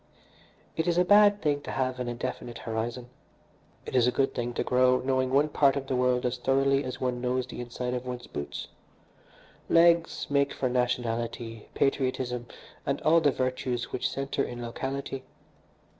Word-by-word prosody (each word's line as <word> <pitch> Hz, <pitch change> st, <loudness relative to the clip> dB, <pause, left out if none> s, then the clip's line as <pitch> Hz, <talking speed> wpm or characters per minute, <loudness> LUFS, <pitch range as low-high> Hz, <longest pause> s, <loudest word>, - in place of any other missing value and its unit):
It 160 Hz, -, -1 dB
is 170 Hz, 0 st, +2 dB
a 180 Hz, -, +4 dB
bad 205 Hz, +1 st, +6 dB
thing 145 Hz, -2 st, +1 dB
to -, -, -8 dB
have 130 Hz, -1 st, -1 dB
an 125 Hz, -, -3 dB
indefinite 120 Hz, 0 st, -4 dB
horizon. 120 Hz, +2 st, -4 dB, 0.7 s
It -, -, -5 dB
is 125 Hz, -1 st, +5 dB
a -, -, +3 dB
good 135 Hz, +2 st, +1 dB
thing 120 Hz, 0 st, -2 dB
to -, -, 0 dB
grow 125 Hz, 0 st, +4 dB
knowing 130 Hz, 0 st, 0 dB
one 140 Hz, +3 st, +3 dB
part 140 Hz, -2 st, +3 dB
of 140 Hz, -1 st, -3 dB
the 135 Hz, -, -1 dB
world 125 Hz, 0 st, +2 dB
as 125 Hz, 0 st, -1 dB
thoroughly 135 Hz, +2 st, +2 dB
as 130 Hz, -1 st, -5 dB
one 125 Hz, -1 st, -1 dB
knows 125 Hz, 0 st, 0 dB
the 125 Hz, -, -7 dB
inside 125 Hz, +1 st, -4 dB
of 125 Hz, -1 st, -3 dB
one's 125 Hz, -1 st, -6 dB
boots. 70 Hz, -, -6 dB, 1.0 s
Legs 170 Hz, 0 st, +4 dB
make 140 Hz, -1 st, +1 dB
for 130 Hz, -, -1 dB
nationality, 120 Hz, -2 st, -2 dB
patriotism, 130 Hz, -3 st, 0 dB, 0.4 s
and -, -, -1 dB
all 165 Hz, +2 st, +5 dB
the 145 Hz, -, +4 dB
virtues 130 Hz, -2 st, -2 dB
which -, -, -1 dB
centre 135 Hz, 0 st, -2 dB
in 120 Hz, -, -6 dB
locality. 135 Hz, +3 st, -4 dB
130 Hz, 175 wpm, -28 LUFS, 125-135 Hz, 1.0 s, bad